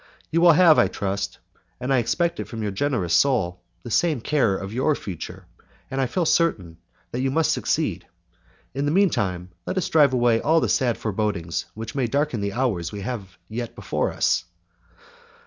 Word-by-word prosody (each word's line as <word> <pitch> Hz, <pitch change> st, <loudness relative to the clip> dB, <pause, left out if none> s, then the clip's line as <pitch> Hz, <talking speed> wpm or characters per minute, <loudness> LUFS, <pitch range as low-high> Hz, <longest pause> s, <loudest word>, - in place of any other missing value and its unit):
You 165 Hz, +1 st, +2 dB
will 175 Hz, -1 st, +8 dB
have, 160 Hz, -1 st, +6 dB
I -, -, +5 dB
trust, 100 Hz, +1 st, -3 dB, 0.4 s
and 130 Hz, +2 st, -1 dB
I 130 Hz, -, +4 dB
expect 170 Hz, +9 st, 0 dB
it -, -, -4 dB
from 115 Hz, -2 st, -5 dB
your 105 Hz, -, -1 dB
generous 100 Hz, -, -1 dB
soul, 95 Hz, -11 st, +2 dB, 0.2 s
the 120 Hz, -, -7 dB
same 155 Hz, +2 st, +2 dB
care 115 Hz, -6 st, +1 dB
of 100 Hz, +2 st, -6 dB
your 130 Hz, +5 st, +1 dB
future, 90 Hz, -, -7 dB, 0.5 s
and 135 Hz, 0 st, -1 dB
I 130 Hz, -, +1 dB
feel 175 Hz, +7 st, -1 dB
certain 100 Hz, -, +1 dB, 0.3 s
that 125 Hz, -, -2 dB
you 135 Hz, -, +1 dB
must 160 Hz, +3 st, +2 dB
succeed. -, -, -1 dB, 0.7 s
In 140 Hz, +2 st, -1 dB
the 145 Hz, -, +1 dB
mean 195 Hz, +1 st, +4 dB
time, 90 Hz, -3 st, -2 dB, 0.2 s
let -, -, -2 dB
us 185 Hz, -, 0 dB
drive 145 Hz, -4 st, +5 dB
away 120 Hz, -2 st, +3 dB
all 160 Hz, +2 st, +3 dB
the -, -, 0 dB
sad 125 Hz, -4 st, +1 dB
forebodings 95 Hz, -6 st, -2 dB
which 110 Hz, +1 st, -6 dB
might 130 Hz, -4 st, -1 dB
darken 140 Hz, -4 st, 0 dB
the 100 Hz, 0 st, -2 dB
hours 110 Hz, -9 st, -1 dB
we 105 Hz, -, -6 dB
have 100 Hz, -4 st, -6 dB
yet 115 Hz, +2 st, -5 dB
before -, -, -2 dB
us." 85 Hz, -, +1 dB
120 Hz, 190 wpm, -24 LUFS, 100-145 Hz, 0.7 s, will